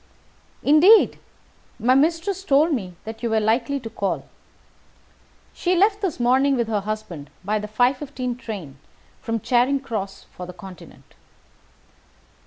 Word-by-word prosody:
"Indeed! 350 +10 +6 0.6
My 245 +3 +3
mistress 330 +7 +1
told 305 0 +3
me 185 -9 -4
that 220 0 -8
you 235 - -1
were 220 0 +2
likely 235 +6 0
to 225 - -7
call. 200 -3 -3 1.3
She 360 +1 0
left 405 +3 +3
this 370 -9 -2
morning 260 +3 +3
with 235 -2 0
her 215 -2 +1
husband 200 -8 -6 0.2
by 210 +2 0
the 210 - -5
5:15 250 +2 -1
train 170 - -7 0.4
from 225 0 -2
Charing 255 +5 +2
Cross 215 -7 -5
for 180 - -8
the 180 - -8
Continent." 180 0 -13
240 Hz, 135 wpm, -23 LUFS, 210-280 Hz, 1.3 s, Indeed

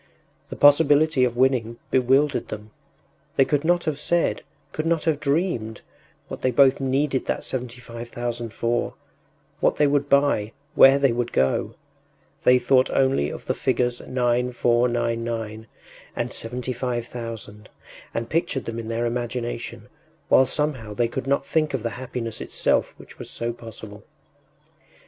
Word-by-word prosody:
The - - -6
possibility 145 -1 +5
of 120 -1 -3
winning 125 -3 +1
bewildered 135 +3 +2
them; 105 0 -8 0.6
they 135 - +5
could 145 +1 0
not 175 +1 +2
have 155 -3 -2
said, 170 +2 +1 0.3
could 155 +1 -3
not 165 -1 +1
have 160 -3 +1
dreamed, 140 - -1 0.5
what - - -7
they 130 - +2
both 130 +2 +4
needed 135 0 0
that - - -2
seventy 125 -1 -4
five 115 -1 -9
thousand 120 -1 -4
for, 120 +1 -1 0.6
what - - +2
they 150 - +3
would 140 0 +1
buy, 140 -7 +2 0.2
where 135 +1 +7
they 140 -2 +3
would 120 0 -2
go. 65 0 0 0.7
They 125 - +5
thought 130 +1 +3
only 130 - +2
of - - -8
the - - 0
figures 125 -1 0
9,499 120 -2 0 0.5
and - - -3
75,000 120 -3 -4 0.4
and 115 0 -3
pictured 155 -2 -1
them 115 0 -4
in 115 - -6
their 115 +1 -1
imagination, 120 0 -4 0.4
while 130 - +6
somehow 130 -9 -2
they 120 +1 +2
could 120 +2 -5
not 140 0 +1
think 155 -1 0
of 120 - -4
the 115 - -2
happiness 120 -3 -5
itself - - 0
which - - -15
was - - -8
so 115 0 -3
possible. 110 -3 -11
125 Hz, 145 wpm, -24 LUFS, 115-140 Hz, 0.7 s, where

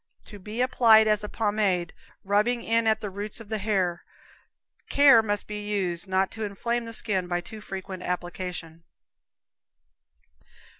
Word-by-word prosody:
To 205 - -11
be 215 +5 -5
applied 225 -4 +5
as 210 -1 +2
a 210 - -5
pomade, 205 -5 0 0.3
rubbing 210 +4 +1
in 230 0 +1
at 220 0 +2
the 205 - -5
roots 205 +3 -6
of 225 -2 -12
the 220 -1 -2
hair. 190 -4 -1 0.9
Care 280 -5 +7
must 205 -2 -2
be 210 0 -6
used 190 -4 -2
not 190 0 +1
to 220 - -6
inflame 235 +4 -2
the 230 - -7
skin 195 -5 0
by 175 0 -1
too 215 +5 -10
frequent 190 -2 -7
application. 175 -2 -5
205 Hz, 150 wpm, -26 LUFS, 185-220 Hz, 0.9 s, Care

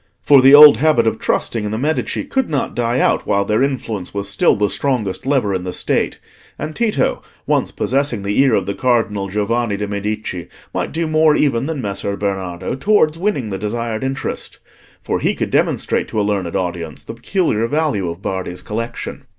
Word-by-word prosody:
For 140 -2 +5
the 135 +2 +8
old 145 -4 +10
habit 135 -4 +3
of 110 -1 0
trusting 115 -2 -1
in 105 - -2
the 110 - -3
Medici 150 +6 -1
could 265 -2 -1
not 145 -3 -2
die 120 +1 0
out - - +1
while 100 0 +1
their 105 +3 +1
influence 115 -9 -3
was 100 0 -2
still 100 0 +3
the 105 0 +1
strongest 120 -3 -2
lever 130 -8 +1
in 90 -1 -2
the 90 - -4
State; - - -1 0.4
and 155 +1 -5
Tito, 230 -3 0 0.2
once - - +1
possessing 135 -5 -1
the 100 +3 -1
ear 135 -5 +4
of 95 - 0
the 100 - -2
Cardinal 110 -5 0
Giovanni 105 +2 -1
de' 105 +1 -3
Medici, 100 -3 -4 0.3
might - - -2
do 165 +1 -2
more 155 -1 +3
even 135 -3 +1
than 160 -4 -3
Messer 100 0 -3
Bernardo 95 -3 -3
towards 155 +1 +2
winning 145 - -1
the 95 - -3
desired 110 +2 -3
interest, 135 0 -4 0.5
for - - -1
he - - 0
could - - -3
demonstrate - - +1
to 110 - -3
a - - +2
learned 95 -5 -2
audience 85 -4 -4
the - - -8
peculiar 115 - 0
value 145 - 0
of 85 +3 -8
Bardi's 95 -1 -4
collection. 115 +2 -5
110 Hz, 190 wpm, -18 LUFS, 100-140 Hz, 0.5 s, old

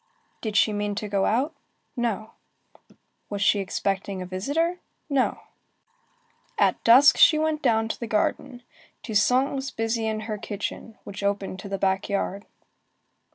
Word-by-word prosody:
Did 215 -2 -2
she 215 - +4
mean 205 0 -2
to 210 +1 -4
go 200 -1 +1
out? 265 +8 +1 0.4
No. 225 -3 -2 1.0
Was 205 -1 -2
she 205 - +4
expecting 195 0 -2
a 185 - -5
visitor? 290 - -1 0.3
No. 270 -2 +1 1.2
At - - +2
dusk, 255 +5 +7
she 310 - +7
went 310 0 0
down 225 -4 +2
to - - -4
the 235 - -4
garden. 230 +3 -1 0.4
Toussaint 250 +5 +2
was 270 0 -3
busy 225 -1 -2
in 215 0 -2
her 215 -1 -5
kitchen, 210 +2 -6
which 200 0 -8
opened 200 -1 -2
on 200 - -7
the 195 - -2
back 190 +1 0
yard. 200 0 -2
215 Hz, 150 wpm, -25 LUFS, 200-245 Hz, 1.2 s, dusk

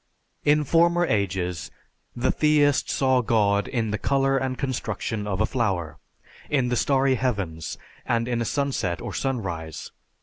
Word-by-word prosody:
In 150 +1 +4
former 170 +3 +3
ages 95 - -1 0.5
the 120 +2 +1
theist 150 -2 +3
saw 130 -2 +2
God 105 -3 +2
in 115 -4 -1
the 105 - -2
color 135 0 +2
and 130 -1 -1
construction 115 -5 -3
of 95 -3 -1
a - - +4
flower, 90 - -2 0.5
in 135 -4 +1
the 125 - +1
starry 135 +2 +2
heavens, 100 -11 -2 0.3
and 115 0 0
in 120 -1 -1
a - - -1
sunset 120 - -1
or - - -6
sunrise. 95 - -3
120 Hz, 145 wpm, -25 LUFS, 100-135 Hz, 0.5 s, In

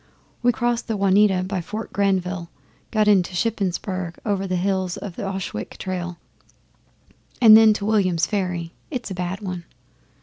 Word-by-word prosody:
We 245 0 +4
crossed 240 0 -1
the 220 -2 -1
Juniata 195 -1 +3
by 185 0 -2
Fort 215 +6 -6
Granville, 185 -3 0 0.4
got 215 -1 +2
into 190 -3 +3
Shippensberg 185 -4 -2
over 195 -2 0
the 185 - -1
hills 185 0 -1
by 205 - -5
the 170 - -8
Ochwick 190 - -5
trail, 180 -2 -4 1.2
and 220 -3 +9
then 220 0 +8
to 205 -1 -4
Williams 185 -6 +2
Ferry 180 -5 -2 0.2
(it's 250 -8 -5
a - - -1
bad 180 +2 -4
one). 180 -3 -5
190 Hz, 155 wpm, -23 LUFS, 180-210 Hz, 1.2 s, and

